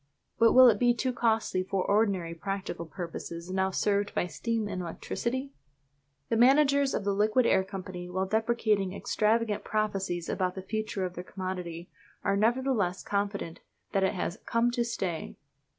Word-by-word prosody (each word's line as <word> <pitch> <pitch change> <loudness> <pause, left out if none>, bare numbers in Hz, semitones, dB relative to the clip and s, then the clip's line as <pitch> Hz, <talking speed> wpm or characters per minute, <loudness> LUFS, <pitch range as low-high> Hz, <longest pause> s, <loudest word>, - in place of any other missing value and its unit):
But 230 0 +6
will 255 0 +9
it 215 -4 +4
be 245 -1 +4
too 255 +1 -1
costly 225 -5 +1
for 190 0 -1
ordinary 200 -5 +1
practical 185 -1 -4
purposes 170 0 -6
now 190 0 +1
served 205 +1 0
by - - +1
steam 225 +4 -2
and 185 -2 -4
electricity? 255 +10 -4 0.8
The 225 - +1
managers 275 +2 +4
of - - -2
the 200 0 +1
Liquid 215 +5 +3
Air 190 - +4
Company, 185 -2 -7
while 185 +1 -1
deprecating 215 -2 +1
extravagant 220 0 +1
prophecies 195 -5 -1
about 185 -1 -1
the 190 - -6
future 215 -1 -2
of 180 - -5
their 180 - -6
commodity, 180 -3 -6 0.3
are 200 -1 +2
nevertheless 225 -4 +1
confident 200 -4 -2 0.3
that 195 - +1
it 190 +2 +1
has 175 -1 -3
"come 230 +1 +2
to 240 0 0
stay." 190 -8 -4
200 Hz, 160 wpm, -29 LUFS, 185-230 Hz, 0.8 s, will